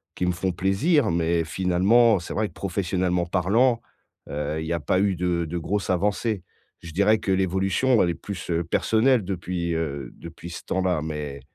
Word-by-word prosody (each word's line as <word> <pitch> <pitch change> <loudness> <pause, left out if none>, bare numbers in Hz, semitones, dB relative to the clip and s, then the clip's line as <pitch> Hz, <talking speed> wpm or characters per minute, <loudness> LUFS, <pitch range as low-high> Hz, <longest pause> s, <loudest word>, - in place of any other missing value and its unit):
qui 90 - -1
me 90 - +2
font 90 +2 -1
plaisir, 110 - +2
mais 85 0 +1
finalement, 95 +6 +3
c'est 85 - -7
vrai 110 0 0
que - - -16
professionnellement 90 -2 -1
parlant, 110 +8 +2 0.5
heu, 75 +1 -3
il 80 - -4
y 80 - -2
a 85 - -1
pas 90 +4 +1
eu 100 -1 +2
de 85 -1 0
de 85 +2 -4
grosse 100 +4 -2
avancée. 100 +2 0 0.4
Je 85 - -9
dirais 100 +6 +3
que 95 - -2
l'évolution, 95 +6 +2
elle 85 - +2
est - - 0
plus, 100 +1 -7
heu, 85 0 +1
personnelle 110 +7 +2
depuis, 90 -2 -3
heu, 75 -4 -3
depuis 85 +1 -10
ce 85 - -8
temps-là, 95 -4 0
mais, 75 -3 -5
90 Hz, 185 wpm, -24 LUFS, 85-100 Hz, 0.5 s, finalement